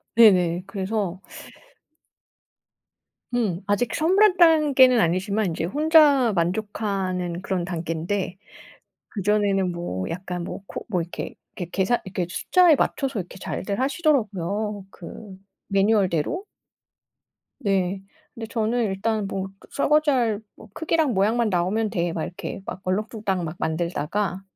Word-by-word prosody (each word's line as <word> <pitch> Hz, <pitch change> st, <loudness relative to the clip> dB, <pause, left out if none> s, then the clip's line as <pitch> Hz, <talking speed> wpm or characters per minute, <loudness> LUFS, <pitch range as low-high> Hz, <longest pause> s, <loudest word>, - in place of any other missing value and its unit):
네네. 180 Hz, -6 st, +5 dB
그래서 195 Hz, -2 st, -3 dB, 2.1 s
음. 205 Hz, -8 st, 0 dB
아직 205 Hz, +4 st, 0 dB
선물할 375 Hz, +5 st, +4 dB
단계는 290 Hz, -8 st, +6 dB
아니지만 195 Hz, +4 st, +1 dB
인제 165 Hz, -1 st, -2 dB
혼자 290 Hz, -, +4 dB
만족하는 185 Hz, -1 st, -2 dB
그런 190 Hz, -2 st, -2 dB
단계인데 175 Hz, +2 st, -3 dB, 0.8 s
그전에는 200 Hz, -2 st, +1 dB
뭐 130 Hz, -, -4 dB
약간 180 Hz, 0 st, -4 dB
뭐 -, -, -6 dB
코 -, -, -7 dB
뭐 180 Hz, -5 st, 0 dB
이렇게, 165 Hz, +1 st, -6 dB, 0.2 s
이렇게 175 Hz, -3 st, -5 dB
계산 195 Hz, +6 st, +1 dB
이렇게 185 Hz, -2 st, -3 dB
숫자에 350 Hz, -, +4 dB
맞춰서 275 Hz, -5 st, -1 dB
이렇게 180 Hz, +1 st, -7 dB
잘들 200 Hz, +2 st, -4 dB
하시더라고요 215 Hz, -, 0 dB
그 190 Hz, +2 st, -10 dB, 0.3 s
매뉴얼대로. 195 Hz, -, +1 dB, 1.2 s
네. 195 Hz, -4 st, 0 dB, 0.3 s
근데 225 Hz, -2 st, -6 dB
저는 230 Hz, +1 st, 0 dB
일단 210 Hz, +1 st, -1 dB
뭐 195 Hz, -1 st, -3 dB
그 -, -, -19 dB
'설거지 300 Hz, +1 st, +2 dB
할 230 Hz, -6 st, +1 dB, 0.2 s
뭐 -, -, -14 dB
크기랑 320 Hz, -5 st, +1 dB
모양만 220 Hz, +4 st, +2 dB
나오면 200 Hz, +4 st, 0 dB
돼.' 170 Hz, -1 st, -1 dB
막 160 Hz, -, -2 dB
이렇게 180 Hz, -, -6 dB
막 -, -, -6 dB
얼렁뚱땅 195 Hz, -1 st, -1 dB
막 165 Hz, +1 st, -5 dB
만들다가 170 Hz, +4 st, -2 dB
200 Hz, 280 characters per minute, -24 LUFS, 180-235 Hz, 2.1 s, 단계는